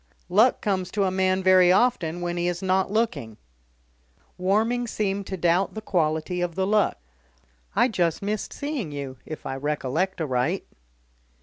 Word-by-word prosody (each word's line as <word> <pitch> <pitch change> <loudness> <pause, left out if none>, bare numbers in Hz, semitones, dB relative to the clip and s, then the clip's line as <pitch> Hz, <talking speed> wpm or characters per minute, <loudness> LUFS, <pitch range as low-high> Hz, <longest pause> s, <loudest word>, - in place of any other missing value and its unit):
Luck 215 +8 +4
comes 185 -4 -1
to 200 - +1
a 190 - +1
man 185 0 +1
very 185 -1 +6
often 185 -6 +2
when 175 0 -2
he's 175 +1 -2
not 190 0 +1
looking." 205 - -1 1.0
Warming 220 +6 +1
seemed 200 -3 -2
to 190 - -4
doubt 175 +4 +1
the - - -3
quality 170 -2 0
of 175 -2 -2
the 190 - 0
luck. 210 +1 +2 0.8
"I - - +4
just 175 -8 0
missed 210 +1 -2
seeing 285 - -4
you, 140 -2 -6
if 155 - -7
I 135 - -3
recollect 150 +6 -2
aright." 130 -6 -1
185 Hz, 150 wpm, -25 LUFS, 165-205 Hz, 1.0 s, very